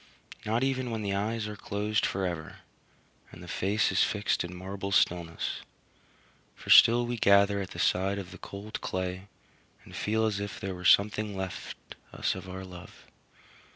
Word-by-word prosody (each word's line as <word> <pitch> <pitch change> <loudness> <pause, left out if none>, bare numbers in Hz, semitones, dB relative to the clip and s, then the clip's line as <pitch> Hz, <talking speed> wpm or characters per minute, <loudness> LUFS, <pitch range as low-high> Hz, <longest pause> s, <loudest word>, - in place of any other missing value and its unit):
Not 115 +3 +1
even 130 -2 0
when 110 -2 -3
the 100 -1 -1
eyes 105 +2 -1
are 105 - -6
closed 105 0 -1
forever, 90 -4 -3 0.8
and - - -12
the - - -10
face 100 +3 +1
is - - +2
fixed 105 -1 +1
in 90 +1 -7
marble 95 +2 -5
stillness; 85 -3 0 0.9
for - - -5
still 120 +1 +8
we 120 0 -3
gather 100 -1 +4
at 95 - -5
the - - -10
side 95 +2 +1
of 95 -2 -6
the 95 - -11
cold 100 +2 -7
clay 95 +1 -3 0.6
and - - -12
feel 110 +1 0
as 105 -2 0
if 100 -1 -5
there 95 0 -4
were 90 0 -8
something 105 +2 +3
left 95 -1 -5 0.3
us - - -1
of 95 0 -8
our 95 +1 -6
love. 90 -2 -12
100 Hz, 170 wpm, -29 LUFS, 95-105 Hz, 0.9 s, still